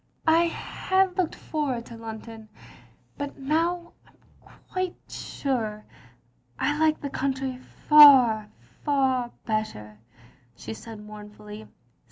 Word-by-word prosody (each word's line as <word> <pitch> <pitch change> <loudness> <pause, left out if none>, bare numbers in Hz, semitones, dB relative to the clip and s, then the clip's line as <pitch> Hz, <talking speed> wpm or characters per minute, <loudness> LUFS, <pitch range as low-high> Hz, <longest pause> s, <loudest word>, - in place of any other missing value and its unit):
" - - -30
"I 330 +2 +5
had 375 +2 0
looked 365 -3 -1
forward 270 -7 -3
to 235 - -10
London; 225 -1 -9 0.7
but 285 0 -5
now 335 +5 -1 0.2
I - - -26 0.4
am - - -18
quite 370 -1 -3
sure 220 -6 -3 0.7
I 290 - 0
like 315 -1 +3
the 280 - -5
country 265 -1 -2 0.3
fer, 260 -8 +8 0.3
far 265 -4 +1 0.2
bet 215 -1 0
ter," 105 - -12 0.6
she 110 -3 -7
said 220 - -10
mournfully. 210 0 -11
260 Hz, 120 wpm, -26 LUFS, 215-305 Hz, 0.7 s, fer